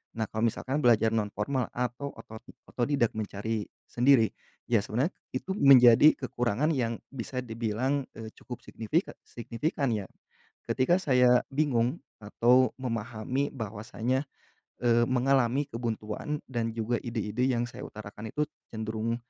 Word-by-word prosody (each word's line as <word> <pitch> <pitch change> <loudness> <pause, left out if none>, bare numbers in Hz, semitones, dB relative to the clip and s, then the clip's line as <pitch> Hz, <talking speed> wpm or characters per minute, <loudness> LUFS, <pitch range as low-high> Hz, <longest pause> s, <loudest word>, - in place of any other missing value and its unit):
nah 115 - -1
kalau 110 +1 +1
misalkan 130 +5 -2
belajar 115 -4 +4
nonformal 110 +4 -1
atau 125 +3 -2
oto 110 0 -11 0.3
otodidak 120 -2 +1
mencari 105 +1 -3 0.2
sendiri, 125 -2 +4 0.4
ya 115 -3 +3
sebenarnya 125 - -1 0.2
itu 155 +9 -4
menjadi 135 - +7
kekurangan 125 +4 0
yang 115 -4 -1 0.2
bisa 130 0 -6
dibilang, 120 +4 -1 0.2
eee, 110 -1 -7
cukup 125 - -8
signifi 115 +10 0 0.2
signifikan 135 +4 -3
ya, 105 -3 -2 0.6
ketika 150 +8 +2
saya 125 -5 +4
bingung 135 -1 +1 0.2
atau 125 +5 +3
memahami 120 +3 -2
bahwasanya, 115 +3 -3 0.6
eee, 120 -1 +4
mengalami 130 +1 +2
kebuntuan 115 +4 -4
dan 120 -3 -1
juga 115 +1 -1
ide-ide 115 0 -2
yang 120 -2 +1
saya 125 +3 -9
utarakan 105 -1 -9
itu 150 - +1 0.3
cenderung, 110 +1 -2
120 Hz, 125 wpm, -29 LUFS, 110-130 Hz, 0.6 s, menjadi